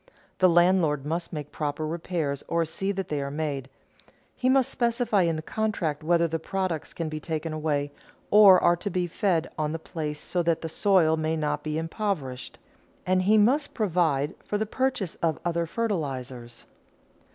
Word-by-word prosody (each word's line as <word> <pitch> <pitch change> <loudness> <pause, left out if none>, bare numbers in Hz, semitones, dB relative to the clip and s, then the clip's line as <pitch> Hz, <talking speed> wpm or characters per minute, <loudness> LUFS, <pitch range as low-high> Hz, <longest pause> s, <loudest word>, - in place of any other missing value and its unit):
The 185 - +6
landlord 170 -5 +3
must 165 +3 -3
make 150 -2 -6
the - - -18
proper 150 0 -2
repairs 160 -3 -3
or 170 0 +1
see 195 +5 -2
that 195 -1 -4
they 150 -2 -1
are 140 - -3
made; 140 -3 -3 0.7
he 255 - +1
must 260 -1 +3
specify 235 -3 +1
in 165 -2 +1
the 155 - -5
contract 180 -8 -2
whether 170 +1 +3
the 165 0 -2
products 185 -2 -3
can 165 - -4
be 155 0 -4
taken 160 0 -4
away 150 -2 -1 0.4
or 200 -3 +8
are 175 - +4
to 175 +4 -4
be 180 -1 0
fed 175 -2 0
on 155 0 -1
the - - -2
place 155 -2 -5
so 180 - -1
that 165 -1 +1
the 165 - -3
soil 165 -2 +3
may 160 +1 -1
not 150 -1 -1
be 155 0 -3
impoverished, 165 - -3 0.5
and 185 0 +2
he 210 +4 +4
must 265 +8 +2
provide 165 - +1
for 210 - -2
the 220 - -1
purchase 240 -6 -1
of 160 -2 0
other 170 -1 0
fertilizers. 135 - -4
165 Hz, 180 wpm, -26 LUFS, 155-190 Hz, 0.7 s, or